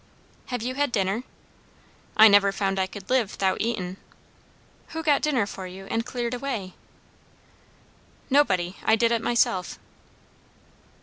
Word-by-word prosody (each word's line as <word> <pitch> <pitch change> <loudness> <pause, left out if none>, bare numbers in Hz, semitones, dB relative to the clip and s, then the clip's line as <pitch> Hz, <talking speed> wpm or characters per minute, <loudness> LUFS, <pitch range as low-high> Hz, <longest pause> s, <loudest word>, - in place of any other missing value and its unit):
"Have 245 -3 -4
you 255 +2 -2
had 285 0 0
dinner?" 200 +2 0 0.9
"I 220 - +10
never 200 -1 +5
found 195 -1 -1
I 190 - +1
could 190 0 -10
live 245 -6 +2
'thout 190 -1 0
eating." 195 -5 -2 0.9
"Who 320 0 -6
got 295 -3 +3
dinner 265 -8 +1
for 190 -2 -7
you, 190 +1 -10
and 225 0 0
cleared 245 -1 -3
away?" 245 -8 -4 1.5
"Nobody. 190 -11 +2
I 220 - +4
did 230 +1 +2
it 230 -1 +1
myself." 195 -7 0
220 Hz, 135 wpm, -25 LUFS, 195-250 Hz, 1.5 s, I